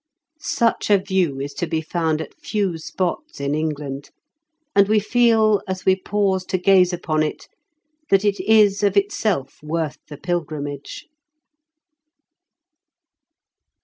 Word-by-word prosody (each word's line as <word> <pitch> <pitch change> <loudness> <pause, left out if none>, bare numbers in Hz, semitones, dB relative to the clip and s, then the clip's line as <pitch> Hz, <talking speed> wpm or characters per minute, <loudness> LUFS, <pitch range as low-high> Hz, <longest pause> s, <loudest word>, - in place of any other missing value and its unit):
Such 230 -6 0
a 205 - +6
view 190 -7 -1
is 140 +1 -5
to 175 - -3
be 160 0 -1
found 160 -1 -1
at - - -8
few 195 -6 -1
spots 185 - -4
in 140 0 -1
England, 150 -3 -3 0.7
and 200 -1 +5
we 215 +1 +3
feel, 220 -1 +3
as 185 -1 -4
we 190 - +5
pause 190 -1 0
to 185 - -1
gaze 185 -1 +4
upon 155 -3 -1
it, 155 - -3 0.6
that 195 +1 +3
it 205 -1 +1
is 205 0 +4
of 200 -1 +2
itself 195 -8 -1
worth 155 -1 -3
the 145 - -9
pilgrimage. 150 -5 -4
185 Hz, 130 wpm, -21 LUFS, 155-200 Hz, 0.7 s, a